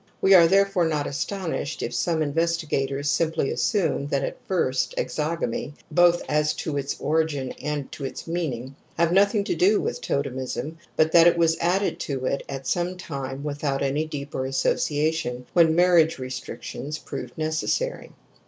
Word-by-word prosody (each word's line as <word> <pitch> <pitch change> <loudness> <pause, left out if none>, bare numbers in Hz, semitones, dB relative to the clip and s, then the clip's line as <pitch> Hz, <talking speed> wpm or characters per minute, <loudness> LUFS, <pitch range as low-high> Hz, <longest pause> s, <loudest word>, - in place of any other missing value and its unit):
We 195 - +5
are 170 -3 +8
therefore 195 -1 +3
not 150 -2 -1
astonished 160 -1 -3
if - - -3
some 165 -2 0
investi 165 +2 0
gators 140 0 -1
simply 160 -1 +1
assume 165 -9 0
that 140 -1 0
at - - -5
first 130 -9 0
exogamy 150 -3 -2
— - - -34
both 175 0 +5
as 150 0 +1
to 150 - -3
its 140 -1 -3
origin 150 -4 0
and 150 -2 -3
to 145 - -8
its 135 - -6
meaning 140 -7 -3
— - - -34
had 170 0 +3
nothing 200 +2 +4
to - - -1
do 185 +5 +3
with - - -3
totemism, 140 +4 -3 0.2
but 155 0 +3
that 170 0 +7
it 170 - +4
was 165 -1 +3
added 185 +4 +1
to 135 -3 -3
it 140 - 0
at 135 -1 -5
some 175 +5 -1
time 140 -5 -5
without 145 -2 -2
any 145 +3 0
deeper 140 -3 -4
association, 135 -1 0
when 165 -2 +5
marriage 175 -2 +4
restrictions 130 +3 -6
proved 125 -5 -7
necessary. 160 - -1
155 Hz, 165 wpm, -25 LUFS, 140-170 Hz, 0.2 s, are